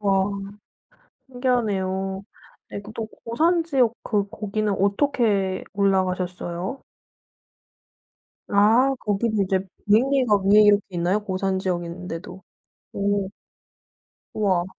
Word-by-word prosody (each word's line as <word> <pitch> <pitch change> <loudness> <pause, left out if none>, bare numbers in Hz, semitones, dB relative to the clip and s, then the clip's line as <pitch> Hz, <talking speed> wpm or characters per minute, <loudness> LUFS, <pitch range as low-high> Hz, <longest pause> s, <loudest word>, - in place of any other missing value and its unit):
와. 195 -2 +2 1.0
신기하네요. 195 -7 -1 0.5
네 - - -5
또 225 0 -4 0.2
고산지역 285 -2 +2
그 205 -3 -1
거기는 215 -1 -2
어떻게 200 -2 +1
올라가셨어요? 185 +1 -1 1.7
아 225 +7 +4
거기도 210 +1 0
이제 190 0 +1 0.3
비행기가 250 +1 +4
위에 205 +2 +7
이렇게 205 -1 +5
있나요? 180 +2 0
고산 190 -1 -1
지역인데도. 180 0 -5 0.5
오. 200 -1 0 1.1
우와. 190 -5 +1
200 Hz, 215 characters per minute, -23 LUFS, 190-225 Hz, 1.7 s, 위에